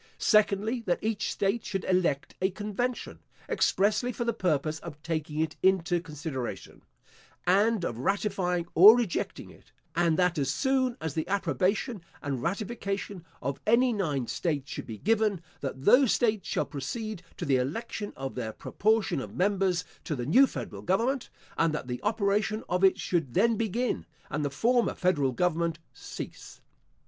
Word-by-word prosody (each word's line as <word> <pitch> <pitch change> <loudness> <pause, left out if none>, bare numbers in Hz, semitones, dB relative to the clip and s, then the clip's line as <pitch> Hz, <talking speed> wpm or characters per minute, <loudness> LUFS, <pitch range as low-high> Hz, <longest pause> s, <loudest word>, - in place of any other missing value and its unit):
Secondly, 215 +2 +2
that 175 - +2
each 215 -1 -1
state 200 +3 0
should 195 -2 -3
elect 180 -7 +1
a 190 - +3
convention, 215 +5 -3 0.3
expressly 215 +5 +2
for 240 +1 -3
the 235 - +1
purpose 155 -5 0
of 155 -4 -9
taking 155 -2 -3
it 160 - -2
into 180 -2 +2
consideration, 150 -5 -6 0.6
and 200 +1 +3
of 115 - -4
ratifying 185 0 0
or 210 +8 +9
rejecting 230 -8 -2
it; - - -20 0.2
and 170 -2 +2
that 180 -3 +2
as 135 -1 0
soon 260 - +1
as 160 -3 -3
the 160 - -2
approbation 195 +3 0 0.2
and 135 -4 -3
ratification 200 - -3 0.2
of 135 +1 -2
any 240 +3 +4
nine 150 - -1
states 145 -1 -2
should - - -6
be 110 - -6
given, 215 - +1 0.2
that 135 -1 -5
those 255 -2 +6
states 215 -6 +1
shall - - 0
proceed 200 - -5 0.2
to 175 - -4
the 135 -3 +3
election 205 - -3
of 135 0 -5
their 110 -3 -4
proportion 205 - 0
of - - -8
members 185 -2 +1 0.2
to 155 - -3
the 120 -2 -4
new 255 - +6
federal - - -6
government; 235 +8 0 0.3
and 165 -2 +2
that 150 - -4
the 125 -1 -5
operation 210 0 0
of 180 +2 0
it 190 - +5
should 165 -9 -1
then 230 +4 +4
begin, 230 +3 -1 0.2
and 150 - -1
the 145 - 0
former 235 - +2
federal 150 -8 +2
government 170 +3 0 0.2
cease. - - -9
185 Hz, 160 wpm, -28 LUFS, 155-215 Hz, 0.6 s, or